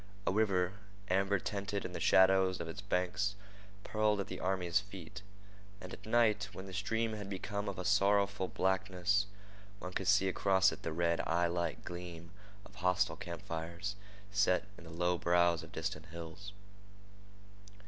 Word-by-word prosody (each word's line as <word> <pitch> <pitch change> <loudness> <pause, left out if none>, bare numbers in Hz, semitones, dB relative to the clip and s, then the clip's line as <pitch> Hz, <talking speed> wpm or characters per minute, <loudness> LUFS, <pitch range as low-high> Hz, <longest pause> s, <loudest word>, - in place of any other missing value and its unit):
A - - +2
river, 95 -3 +2 0.4
amber 95 +2 +3
tinted 100 +1 -3
in 90 - -5
the 85 - -4
shadow 95 +2 +6
of 95 -2 -3
its 85 +4 -6
banks, 100 +1 0 0.5
purled 110 -1 +1
at 100 - -1
the 95 - -5
army's 90 -1 +1
feet; 95 -1 -9 0.6
and 90 -2 -8
at - - -10
night, 110 -3 +3
when 95 - -7
the 95 - -9
stream 110 +3 0
had 105 -2 -6
become 100 +1 -3
of 100 - -5
a 90 - -4
sorrowful 100 0 +3
blackness, 95 +1 +1 0.5
one 90 -2 -7
could 95 - -2
see 95 0 +5
across 95 0 +3
it - - -8
the 80 - -3
red, 85 +1 +1
eyelike 85 0 0
gleam 85 -1 -7 0.3
of - - -15
hostile 90 -1 +1
camp 85 -2 -7
fires 85 +4 -4 0.4
set 95 -2 +3
in 85 - -14
the - - -10
low 90 +1 0
brows 85 -1 +3
of 80 - -11
distant 75 +1 -4
hills. 85 +4 -8
95 Hz, 160 wpm, -34 LUFS, 85-100 Hz, 0.6 s, shadow